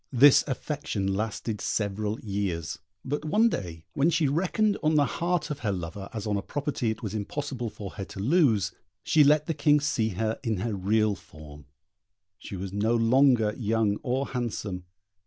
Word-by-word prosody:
This 135 +2 +7
affection 130 -8 -2
lasted 110 +1 -3
several 105 +1 -1
years; 95 -5 -3 0.3
but 145 +3 -2
one 210 +9 +3
day 85 - -5
when 145 +4 +3
she 160 -3 +2
reckoned 190 +8 +1
on 155 +1 +2
the 145 -1 +5
heart 170 -1 -1
of 145 - -4
her 110 -6 -1
lover 95 +1 -5
as 110 -2 -5
on 105 -1 0
a - - -2
property 140 -2 -2
it 110 - -4
was 105 -2 -3
impossible 120 +3 -3
for 105 -2 -8
her 95 - -6
to 95 - -10
lose, 110 - +3 0.3
she 155 - +5
let 150 +1 +4
the 165 - -1
King 145 0 +4
see 135 -7 0
her 110 +3 -2
in 115 -5 0
her 115 +1 -1
real 105 +2 +2
form: 75 -5 -12 0.7
she - - -8
was 95 +1 -5
no 110 +3 +1
longer 115 -1 +4
young 110 -3 +1
or 135 +1 -1
handsome. 105 -7 -3
110 Hz, 175 wpm, -27 LUFS, 100-145 Hz, 0.7 s, This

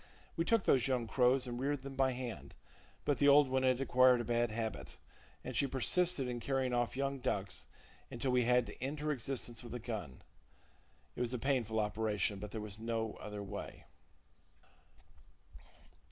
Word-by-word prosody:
We 165 - 0
took 225 -1 +3
those 130 -2 +3
young 125 -3 0
crows 125 +3 +3
and 120 -1 -5
reared 140 0 -1
them 135 0 -7
by 135 -1 +2
hand; 125 -4 -6 0.5
but 145 - +1
the 145 - +4
old 140 -1 +7
one 130 0 +1
had 130 -1 +2
acquired 130 -1 +5
a - - -1
bad 120 0 +1
habit, 110 - -5 0.5
and 130 - -6
she 140 - +2
persisted 140 +3 +2
in 120 -1 -3
carrying 130 0 -1
off 120 +1 0
young 140 0 -1
ducks 100 -6 -2 0.4
until 125 +2 -2
we 125 -1 +3
had 125 0 +4
to - - -11
end 140 +3 -3
her 150 0 0
existence 125 -3 -2
with 120 0 -7
a - - -4
gun. 105 - -6 0.9
It - - -4
was 125 +1 -1
a - - -1
painful 120 -4 0
operation, 105 -1 0
but 105 - -6
there 110 - -5
was 105 0 -5
no 115 -1 -2
other 105 -1 -6
way. 100 - -7
125 Hz, 180 wpm, -35 LUFS, 115-135 Hz, 0.9 s, old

